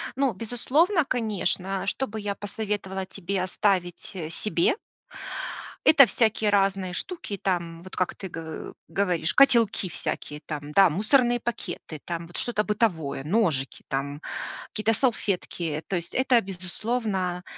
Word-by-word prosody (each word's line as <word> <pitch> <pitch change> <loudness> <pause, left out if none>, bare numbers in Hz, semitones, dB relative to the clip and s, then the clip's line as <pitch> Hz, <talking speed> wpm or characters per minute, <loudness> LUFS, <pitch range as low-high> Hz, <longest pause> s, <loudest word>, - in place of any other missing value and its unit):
Ну, 270 -2 +2
безусловно, 275 - +2
конечно, 195 -6 -1
что 265 +6 0
бы 220 -1 -5
я 205 -1 -2
посоветовала 205 -2 -3
тебе 190 0 -3
оставить, 185 -1 0
э, 160 -4 -4
себе 215 - +1 1.1
это 280 -3 +9
всякие 220 -2 +2
разные 195 -2 +2
штуки, 330 - -4
там, 170 -3 -2
вот 185 - -9
как 185 - 0
ты 195 - -6
г 165 -1 -6 0.2
говоришь, 180 -5 +1
котелки 235 -8 +5
всякие, 150 -2 -4
там, 150 -1 -5
да, 195 +1 +7
мусорные 240 - +3
пакеты, 190 -9 -5
там, 170 -1 -4
вот 175 - -7
что-то 230 -3 +1
бытовое, 175 -11 0
ножики, 155 - 0
там, 140 +2 -3 0.5
какие-то 215 +1 +1
салфетки. 180 - -1
То 195 - -1
есть, 170 -1 -3
это 255 -2 +4
безусловно, 190 -1 -2
195 Hz, 135 wpm, -26 LUFS, 175-225 Hz, 1.1 s, это